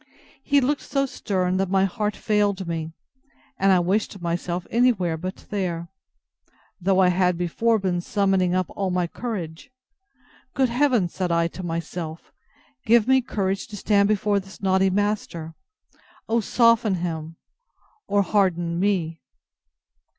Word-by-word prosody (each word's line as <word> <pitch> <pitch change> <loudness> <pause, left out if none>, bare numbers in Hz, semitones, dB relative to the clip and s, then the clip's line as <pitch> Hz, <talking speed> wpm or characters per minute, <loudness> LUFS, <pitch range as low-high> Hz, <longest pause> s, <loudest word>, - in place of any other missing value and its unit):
He 285 -1 +3
looked 285 +3 0
so 275 -1 -1
stern, 185 -7 -1
that 190 -1 0
my 190 0 +3
heart 210 +2 -2
failed 205 -3 0
me, 165 -1 -3 0.7
and 195 0 +4
I 185 - +5
wished 195 +3 -1
myself 175 +1 -3
any 245 +2 +4
where 180 -7 -2
but 185 +4 -7
there, 175 -4 -2 0.9
though 190 +1 +2
I 185 -1 +5
had 180 -1 +2
before 220 +7 +1
been 185 -3 -1
summoning 190 -1 +1
up 185 0 +1
all 195 -1 -2
my 180 -1 0
courage. 180 - -6 0.9
Good 265 -2 +2
Heaven, 245 -6 +2
said 180 0 -3
I 170 0 +2
to 185 - -8
myself, 165 -1 -5 0.5
give 230 0 +4
me 265 0 +5
courage 195 -5 -2
to 210 - -8
stand 200 0 +3
before 205 -1 +2
this 195 0 -12
naughty 190 0 +2
master! 190 -5 -2 0.7
O 230 +1 +2
soften 230 -2 +3
him, 165 -2 -4 0.7
or 200 0 +2
harden 175 -4 +1
me! 175 -5 0
190 Hz, 145 wpm, -24 LUFS, 175-210 Hz, 0.9 s, I